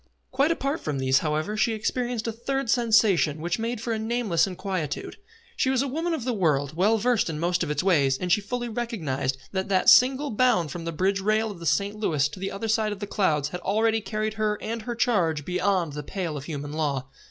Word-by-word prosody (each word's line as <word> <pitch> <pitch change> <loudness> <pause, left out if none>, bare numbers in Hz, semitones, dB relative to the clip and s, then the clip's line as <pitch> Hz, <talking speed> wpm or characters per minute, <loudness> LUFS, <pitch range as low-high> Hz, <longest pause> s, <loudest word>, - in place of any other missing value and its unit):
Quite 275 +4 +2
apart 290 -2 -1
from 150 -2 -3
these, 130 0 +3
however, 155 +7 -1
she 225 +2 +1
experienced 240 +1 -2
a 230 - -1
third 240 +2 -2
sensation 215 - +3
which 175 +6 -2
made 230 +1 -2
for 230 +1 -2
a 220 - -2
nameless 220 -6 +1
inquietude. 185 -5 -4 0.4
She 260 - +1
was 265 0 +2
a - - -2
woman 325 +5 -1
of 265 - -5
the 250 0 -1
world, 155 -7 0
well 205 +6 +3
versed 240 -3 +1
in 155 - -3
most 175 +2 0
of 165 - -1
its 150 +1 -1
ways, 140 -8 +3
and 180 +3 -3
she 210 - +4
fully 240 +4 -3
recognised 175 - -2
that 190 +1 -2
that 185 -2 +4
single 270 +3 +5
bound 220 - +2
from 170 -1 -6
the 165 - -2
bridge 190 +5 0
rail 215 +2 +1
of 190 - -10
the 170 - -4
St. 200 +8 +1
Louis 155 -9 +1
to 150 - -10
the 195 +1 -3
other 200 +3 -4
side 220 -1 +1
of 205 - -5
the 205 - -3
clouds 155 -8 0
had 180 +2 -6
already 220 +3 +1
carried 215 +1 -2
her 210 -1 +1
and 230 +1 -4
her 240 +2 -4
charge 170 - +1
beyond 180 -3 0
the 150 - -4
pale 170 +1 -4
of 140 -1 -6
human 145 -2 -5
law. 140 -4 -1
200 Hz, 230 wpm, -25 LUFS, 160-230 Hz, 0.4 s, single